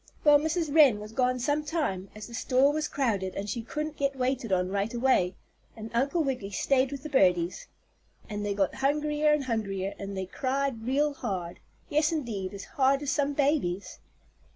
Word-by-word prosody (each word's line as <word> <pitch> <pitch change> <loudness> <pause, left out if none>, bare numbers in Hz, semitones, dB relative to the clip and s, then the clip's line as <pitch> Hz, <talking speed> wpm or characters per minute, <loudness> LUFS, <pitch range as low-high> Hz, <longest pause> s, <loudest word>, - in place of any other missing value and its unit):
Well, 295 -1 +7
Mrs. 315 0 -1
Wren 285 -9 +6
was 210 +1 -8
gone 255 +2 +1
some 290 +4 0
time, 280 - -2
as 215 - -7
the 235 - -12
store 260 +4 +3
was 310 0 -1
crowded 205 -9 -1
and 200 - -4
she 220 +3 -3
couldn't 300 +6 -4
get 275 -1 0
waited 255 -3 -1
on 180 -1 +1
right 200 +2 -1
away, 235 -7 +2 0.4
and 220 0 -7
Uncle 280 +8 +1
Wiggily 255 -8 -2
stayed 260 +6 +1
with 280 -1 -6
the 305 - -6
birdies. 180 - +2 0.6
And 210 -1 -4
they 205 -1 -1
got 195 -2 +1
hungrier 300 +2 +1
and 300 -1 +2
hungrier, 200 -5 -2
and 200 -1 -5
they 190 - -2
cried 260 +1 -2
real 290 +3 +2
hard. 185 -10 -4 0.3
Yes, 305 +2 +2
indeed, 230 - -3
as 200 - -7
hard 275 -1 +1
as 285 - -1
some 285 0 0
babies. 260 - 0
255 Hz, 185 wpm, -28 LUFS, 200-290 Hz, 0.6 s, Well